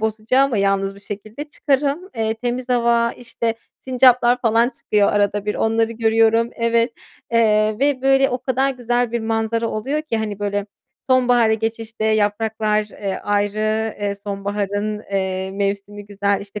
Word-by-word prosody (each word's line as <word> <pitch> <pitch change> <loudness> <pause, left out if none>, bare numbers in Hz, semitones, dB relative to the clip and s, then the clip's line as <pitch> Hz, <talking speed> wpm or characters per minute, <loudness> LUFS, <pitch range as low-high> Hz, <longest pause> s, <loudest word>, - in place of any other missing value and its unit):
bozacağıma 225 +4 +1
yalnız 195 0 +1
bir 200 - -15
şekilde, 210 +6 -7
çıkarım, 295 +3 -1
eee, 220 0 0
temiz 245 +2 -4
hava, 235 -1 +2
işte, 230 -1 -2 0.3
sincaplar 250 -1 +4
falan 230 0 +3
çıkıyor 205 -1 +2
arada 205 0 +1
bir, 210 - 0
onları 225 +1 +1
görüyorum. 225 0 +2
Evet, 230 +1 +1 0.4
eee, 215 -2 +3
ve, 275 -1 +1
böyle, 270 0 +4
o 250 - -1
kadar 265 +1 0
güzel 245 -2 -1
bir 235 - -1
manzara 225 +1 -1
oluyor 270 +9 -2
ki, 300 -7 -2
hani, 215 -2 -3
böyle, 205 0 -2 0.4
sonbahara 245 -3 +4
geçişte 225 0 -4
yapraklar, 215 0 +1
eee, 200 -2 -4
ayrı, 215 +2 0
eee, 200 -1 -1
sonbaharın, 205 +1 -3
eee, 190 -1 -1
mevsimi 200 +1 -3
güzel, 200 0 0
işte, 200 +1 -8
220 Hz, 145 wpm, -20 LUFS, 205-240 Hz, 0.4 s, sincaplar